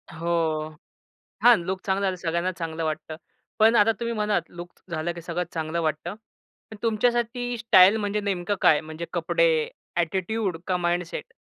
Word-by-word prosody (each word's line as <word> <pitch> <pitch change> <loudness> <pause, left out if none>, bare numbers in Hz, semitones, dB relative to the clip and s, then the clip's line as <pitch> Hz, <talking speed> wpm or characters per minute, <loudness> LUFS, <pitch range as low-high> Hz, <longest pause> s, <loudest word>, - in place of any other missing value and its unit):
हो. 160 -2 -1 0.7
हां, 240 -1 +8
लूक 190 +1 -3
चांगला 195 0 +1
झालं, 190 -1 -1
सगळ्यांना 170 +1 -1
चांगलं 165 -1 -3
वाटतं. 155 0 -4 0.4
पण 225 +2 +5
आता 215 +1 +5
तुम्ही 235 0 -2
म्हणालात 210 -1 0
लूक 175 0 -9 0.2
झालं 165 +1 -2
की 170 - -9
सगळं 175 +1 -2
चांगलं 160 +1 -2
वाटतं. 155 +4 -2 0.6
पण 220 - -9
तुमच्यासाठी 240 +2 0
स्टाईल 205 -2 +6
म्हणजे 210 0 -1
नेमकं 200 -1 -1
काय? 150 - +5
म्हणजे 160 +2 -7
कपडे, 480 -2 +2 0.3
ॲटिट्यूड 190 +3 -1
का 185 - +1
माइंडसेट? 175 -1 -2
180 Hz, 150 wpm, -25 LUFS, 165-220 Hz, 0.7 s, हां